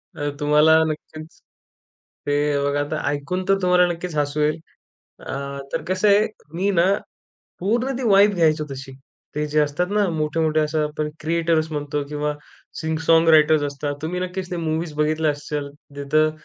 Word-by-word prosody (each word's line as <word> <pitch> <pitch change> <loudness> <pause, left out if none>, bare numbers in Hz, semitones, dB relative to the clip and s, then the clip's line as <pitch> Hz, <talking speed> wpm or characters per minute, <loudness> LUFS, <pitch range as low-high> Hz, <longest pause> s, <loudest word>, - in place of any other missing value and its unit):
अ, 145 0 -2
तुम्हाला 150 +2 +5
नक्कीच, 155 0 -7 0.9
ते 145 - +1 0.3
बघा 145 0 0
आता 145 - -2
ऐकून 145 +6 -2
तर 195 - +5
तुम्हाला 180 0 +4
नक्कीच 175 0 -4
हसू 145 +1 0
येईल 150 0 +2 0.7
अ, - - -6 0.4
तर - - -2
कसं 185 +3 +2
आहे 205 +1 +5 0.3
मी 195 +3 +1
ना 175 -3 +3 0.8
पूर्ण 240 +8 0
ती - - -4
वाईब 200 0 +5
घ्यायचो 155 -3 +2
तशी. 135 0 -8 0.4
ते 150 0 -1
जे 150 +1 +2
असतात 150 +4 0
ना 205 -1 +2
मोठे-मोठे 155 0 0
अशा 155 0 0
आपण 150 0 -3
क्रिएटर्स 165 0 0
म्हणतो 145 0 -2
किंवा 150 0 -2 0.5
सिंग 160 0 -1
सॉन्ग 165 0 +5
रायटर्स 155 -1 +5
असतात 145 0 -3
तुम्ही 175 +3 -3
नक्कीच 185 0 -4
ते 180 - -3
मूवीज 160 -1 -2
बघितल्या 155 +1 +1
असशाल. 145 0 -4 0.3
जिथं 155 +2 +2
155 Hz, 160 wpm, -22 LUFS, 150-175 Hz, 0.9 s, तुम्हाला